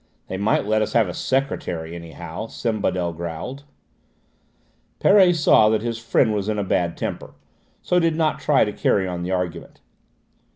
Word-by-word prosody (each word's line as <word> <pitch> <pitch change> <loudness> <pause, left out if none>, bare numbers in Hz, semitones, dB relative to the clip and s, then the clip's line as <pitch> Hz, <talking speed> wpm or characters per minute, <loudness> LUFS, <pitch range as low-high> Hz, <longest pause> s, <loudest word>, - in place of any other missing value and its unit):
"They 95 - -3
might 100 +1 +1
let 110 +1 +1
us 110 - -2
have 115 -4 +3
a 90 - -5
secretary, 90 -12 -2
anyhow," 85 +3 -7
Sembadel 95 -8 -2
growled. 85 - -6 1.3
Perret 190 -3 +5
saw 130 -8 +5
that 110 0 0
his 115 -1 -3
friend 115 -1 +2
was 105 0 -2
in 105 - -1
a 105 - 0
bad 90 -3 -1
temper, - - -5 0.5
so 180 - +2
did 165 -2 +1
not 160 -1 0
try 145 -6 +3
to 105 - -4
carry 95 -1 +1
on 90 -1 -4
the 90 - -4
argument. 90 -2 -4
105 Hz, 165 wpm, -22 LUFS, 90-125 Hz, 1.3 s, Perret